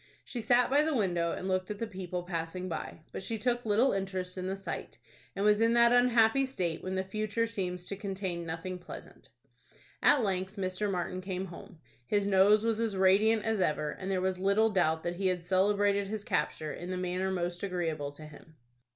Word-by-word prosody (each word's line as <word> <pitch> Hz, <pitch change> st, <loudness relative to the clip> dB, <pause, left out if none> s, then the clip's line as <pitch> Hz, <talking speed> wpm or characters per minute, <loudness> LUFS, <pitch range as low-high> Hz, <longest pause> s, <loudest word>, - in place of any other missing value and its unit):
She 240 Hz, -, -5 dB
sat 245 Hz, +3 st, +3 dB
by 285 Hz, +2 st, +5 dB
the 310 Hz, -1 st, 0 dB
window, 175 Hz, -6 st, +1 dB
and 185 Hz, -, -4 dB
looked 185 Hz, -1 st, 0 dB
at 210 Hz, -, -4 dB
the 230 Hz, -, -2 dB
people 185 Hz, -4 st, -5 dB
passing 175 Hz, +1 st, -4 dB
by, 165 Hz, -1 st, -5 dB
but -, -, -5 dB
she 225 Hz, +4 st, -3 dB
took 240 Hz, +2 st, 0 dB
little 225 Hz, +6 st, +4 dB
interest 190 Hz, -2 st, -3 dB
in 185 Hz, -1 st, -4 dB
the 190 Hz, -, -2 dB
sight, 195 Hz, 0 st, -6 dB, 0.4 s
and 200 Hz, +1 st, -1 dB
was 210 Hz, +1 st, +4 dB
in 230 Hz, +1 st, +4 dB
that 235 Hz, 0 st, +6 dB
unhappy 245 Hz, +1 st, +4 dB
state 175 Hz, -11 st, -2 dB
when 185 Hz, 0 st, -3 dB
the 190 Hz, -, 0 dB
future 215 Hz, +3 st, -1 dB
seems 180 Hz, -5 st, -4 dB
to 200 Hz, -, -4 dB
contain 190 Hz, -3 st, -4 dB
nothing 170 Hz, +3 st, -5 dB
pleasant. 175 Hz, -, -11 dB, 0.7 s
At 290 Hz, -4 st, +5 dB
length 190 Hz, -1 st, -1 dB
Mr. 190 Hz, +1 st, -1 dB
Martin 185 Hz, 0 st, -2 dB
came 185 Hz, 0 st, -3 dB
home. 170 Hz, -1 st, -11 dB, 0.3 s
His 205 Hz, -1 st, +1 dB
nose 200 Hz, +2 st, +5 dB
was 225 Hz, -1 st, +1 dB
as 225 Hz, -4 st, -1 dB
radiant 210 Hz, +4 st, +4 dB
as 220 Hz, -3 st, +1 dB
ever, 150 Hz, -3 st, 0 dB
and 190 Hz, -, -6 dB
there 190 Hz, -1 st, 0 dB
was 185 Hz, 0 st, -1 dB
little 200 Hz, +4 st, +3 dB
doubt 160 Hz, -5 st, +1 dB
that 175 Hz, 0 st, -3 dB
he 195 Hz, 0 st, +1 dB
had 180 Hz, -2 st, 0 dB
celebrated 200 Hz, +2 st, +2 dB
his 210 Hz, 0 st, -4 dB
capture 155 Hz, -6 st, -1 dB
in 175 Hz, -, -7 dB
the 185 Hz, -, -2 dB
manner 180 Hz, +1 st, -1 dB
most 175 Hz, -1 st, -2 dB
agreeable 165 Hz, -7 st, -2 dB
to 155 Hz, +2 st, -11 dB
him. 155 Hz, +1 st, -14 dB
190 Hz, 205 wpm, -30 LUFS, 180-215 Hz, 0.7 s, that